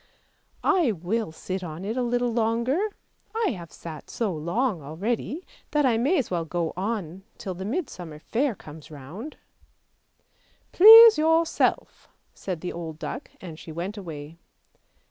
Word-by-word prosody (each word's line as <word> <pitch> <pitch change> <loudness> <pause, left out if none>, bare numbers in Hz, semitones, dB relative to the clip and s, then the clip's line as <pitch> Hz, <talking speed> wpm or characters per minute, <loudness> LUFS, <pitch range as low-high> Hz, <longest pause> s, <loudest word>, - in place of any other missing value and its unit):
" - - -43 0.2
I 355 - +3
will 190 +2 -2
sit 185 +3 -5
on 165 +2 -6
it 220 +3 -2
a 255 - 0
little 245 0 0
longer, 235 - +1 0.5
I 450 -3 +1
have 175 -7 -8
sat 160 -2 -10
so 215 -6 -2
long 175 - -1
already, 215 - -3 0.2
that 295 -1 +2
I 230 -3 +3
may 290 +10 +2
as 260 -9 -1
well 170 -2 0
go 165 0 -2
on 190 -3 -3 0.2
till 190 - -5
the 190 +2 -7
Midsummer 195 - -4
Fair 235 - -1
comes 155 -3 -12
round." 160 - -9 0.7
" - - -40
Please 445 +2 +10
yourself," 325 +1 +1 0.2
said 180 -5 -5
the 180 - -4
old 165 -2 -6
duck, - - -6
and 165 -4 -9
she 160 - -10
went 175 +6 -4
away. 165 -4 -8
200 Hz, 155 wpm, -25 LUFS, 165-255 Hz, 0.7 s, Please